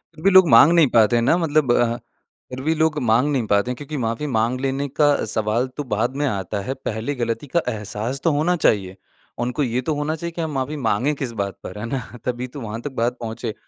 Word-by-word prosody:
फ़िर 155 - -13
भी 195 - +5
लोग 190 -2 +7
माँग 125 +7 +8
नहीं 165 -4 +5
पाते 115 0 +5
हैं 115 - +2
ना 130 - +4
मतलब 155 -6 +2
अ, 120 -1 +2 0.5
फ़िर 130 +1 -6
भी 160 - +3
लोग 160 -1 +1
माँग 120 +3 +3
नहीं 130 -5 0
पाते 100 +5 +2
हैं - - -3
क्योंकि 145 +2 -6
माफ़ी 115 +3 -2
माँग 120 0 0
लेने 135 +1 -1
का 150 -1 +6 0.2
सवाल 110 +3 0
तो 145 - -2
बाद 120 +1 -1
में 145 - 0
आता 100 -3 -3
है, 130 +7 -3
पहले 125 +1 -4
ग़लती 120 +3 -3
का 170 +6 +1
एहसास 110 +4 -4
तो 165 - +3
होना 155 +5 +1
चाहिए। 100 - +1 0.4
उनको 125 +4 -1
ये 125 0 -1
तो 155 - -1
होना 150 +2 -1
चाहिए 170 +1 -5
कि 170 - -3
हम 160 -1 -2
माफ़ी 135 +3 -2
माँगें 125 +2 +1
किस 135 -4 -4
बात 100 -2 -6
पर 95 - -8
है 105 - -4
ना 130 +3 -2 0.3
तभी 125 0 -2
तो 140 - -6
वहाँ 115 0 -5
तक 145 - -5
बात 120 0 -1
पहुँचे। 115 -1 -5
125 Hz, 240 wpm, -22 LUFS, 115-145 Hz, 0.5 s, माँग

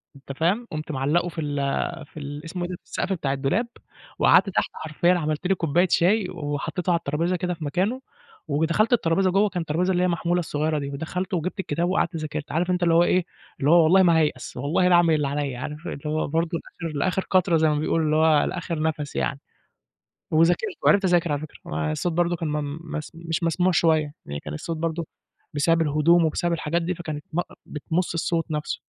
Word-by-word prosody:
أنت 135 0 -10
فاهم؟ 200 +9 +1
قُمت 155 +1 -4
معلَّقُه 150 +6 +1
في 165 - -5
ال 145 -1 -3 0.5
في 150 - -18
ال 145 +2 -7
اسمه 175 +2 -4
إيه 175 - -3
ده، 180 - -4
في - - -17
السقف 195 - -2
بتاع 145 -7 -1
الدولاب 140 - 0 0.5
وقعدت 200 - +5
تحت 185 - 0
حرفيًا 160 +3 +1
عملت 155 0 -1
لي 195 - +3
كوباية 175 +2 +2
شاي 190 +3 +3
وحطيته 155 +2 -3
على 170 - +4
الترابيزة 165 +3 -1
كده 180 0 -2
في 165 - -8
مكانه، 195 - -1 0.5
ودخلت 160 +10 +1
الترابيزة 185 -3 +2
جُوّه، 200 +2 +3
كانت 180 -2 -3
الترابيزة 180 +5 +1
اللي 180 0 +1
هي - - +4
المحمولة 175 0 0
الصغيّرة 155 -2 -1
دي، 140 -1 -4
ودخلت 170 +7 -4
وجبت 180 +3 -2
الكتاب 170 0 -1
وقعدت 185 -2 0
ذاكرت. 155 -1 -5
عارف 175 +3 0
أنت 180 0 0
اللي 170 -1 +3
هو 170 +1 +6
إيه، 180 0 +2 0.3
اللي 140 - +2
هو 170 -1 +7
والله 185 +4 +5
ما 170 -2 +5
هايأس 150 -6 -1
والله 150 +8 +1
لاعمل 175 -2 +5
اللي 150 -2 0
عليَّ، 140 -2 -2
عارف 150 +6 -6
اللي 140 - -5
هو 155 +1 0
برضه 165 +3 0 0.3
لآخر 160 -3 -3
لآخر 185 +6 0
قطرة 185 -2 +3
زي 160 0 +3
ما 150 - +1
بيقولوا 160 +1 +1
اللي 155 0 +2
هو 155 -1 +4
لآخر 170 -3 -3
نَفَس 155 -2 -2
يعني، 140 -1 -1 0.9
وذاكرت، 175 - +2
وعِرفت 200 0 +5
اذاكر 175 -3 +2
على 145 - -1
فكرة، 155 - -9
آآ، 75 0 -2
الصوت 165 - -1
برضه 175 +1 +1
كان 165 -1 -3
م 150 0 -3
مس 155 -2 -6
مش 165 0 -3
مسموع 175 +2 +2
شوية، 155 -4 +2
يعني 70 0 -5
كان 75 - -7
الصوت 165 - -4
برضه 165 0 -2 0.5
بسبب 165 +3 +2
الهدوم 160 +3 +4
وبسبب 170 +2 0
الحاجات 170 +1 -1
دي 175 +2 -1
فكانت 155 -3 -6
ب 170 - 0
أأ - - -5
بتمص 165 +4 -2
الصوت 165 0 -1
نَفْسه. 150 0 -3
165 Hz, 210 wpm, -24 LUFS, 150-175 Hz, 0.9 s, هو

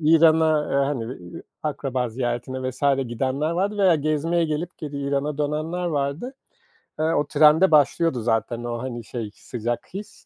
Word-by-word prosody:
İran'a, 160 0 +5 0.3
hani, 130 -3 -3 0.5
akraba 130 -4 -2
ziyaretine 125 +2 -3
vs. 130 - -14 0.3
gidenler 135 +6 -1
vardı 195 +5 -1
veya 190 -3 +5
gezmeye 155 +3 +1
gelip 160 +3 -3
geri 150 -2 -6
İran'a 140 +1 -1
dönenler 155 +4 -2
vardı. 155 - -2 0.7
Eee, 155 - +1
o 160 -2 +2
trende 160 +5 +5
başlıyordu 150 -2 +3
zaten 115 +1 -1
o, 120 0 -3
hani, 120 -3 -5
şey 110 -1 -5
sıcak 120 +4 -5
his, 200 +2 -9
145 Hz, 140 wpm, -24 LUFS, 125-160 Hz, 0.7 s, İran'a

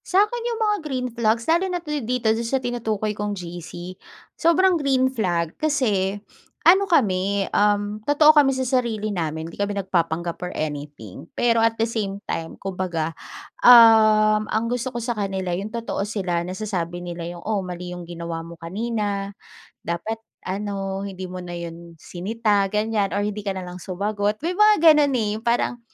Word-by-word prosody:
Sa'kin 420 +5 +2
yung 465 -1 -3
mga 420 -1 +2
green 260 -5 -3
flags 230 0 +1
lalo 340 +4 +2
na 360 - -1
dito 250 -5 -2
do'n 225 - -2
sa 270 - +1
tinutukoy 220 -4 -2
kong 205 0 -3
GC. 175 0 -7 0.4
Sobrang 360 +3 +3
green 265 -5 +1
flag 175 -8 -1
kasi 215 -11 +1 0.5
ano 380 +4 +7
kami, 200 - +2
um, 205 0 +1
totoo 300 +1 +6
kami 295 -3 +5
sa 260 0 -2
sarili 235 -5 0
namin 160 -3 -3
hindi - - -13
kami 200 0 -1
nagpapanggap 170 -3 -1
or 180 - -6
anything. 145 - -6
Pero, 235 -1 +2
at 225 0 +3
the 225 +1 0
same 200 -3 -3
time, 165 0 -3
kumbaga, 180 -4 -3 0.5
um, 215 -3 +7
ang 220 +1 -1
gusto 245 +1 -2
ko - - -4
sa 235 -1 -3
kanila 190 -3 -2
yung 205 +4 -6
totoo 230 -4 -3
sila, 180 -5 -2
nasasabi 180 -2 -4
nila 175 -1 -6
yung, 175 - -10
"Oh, 210 -3 -1
mali 180 0 -6
yung 175 - -8
ginawa 170 -1 -5
mo 170 0 -11
kanina. 200 +1 -3 0.5
Dapat 170 +7 -3 0.3
ano, 195 0 -3
hindi 190 -1 -7
mo 185 0 -6
na 175 -1 -7
'yon 170 0 -8
sinita, 205 +4 -1
ganyan 210 0 0
or 205 - 0
hindi 210 0 -4
ka 195 - -1
na 190 - -5
lang 180 0 -8
sumagot." 205 +4 -2
May 350 +3 -2
mga 425 0 +6 0.2
gano'n, 290 -2 +3
eh, 230 -4 +1
yung 225 - -22
parang 240 +1 +1
205 Hz, 170 wpm, -23 LUFS, 180-240 Hz, 0.5 s, ano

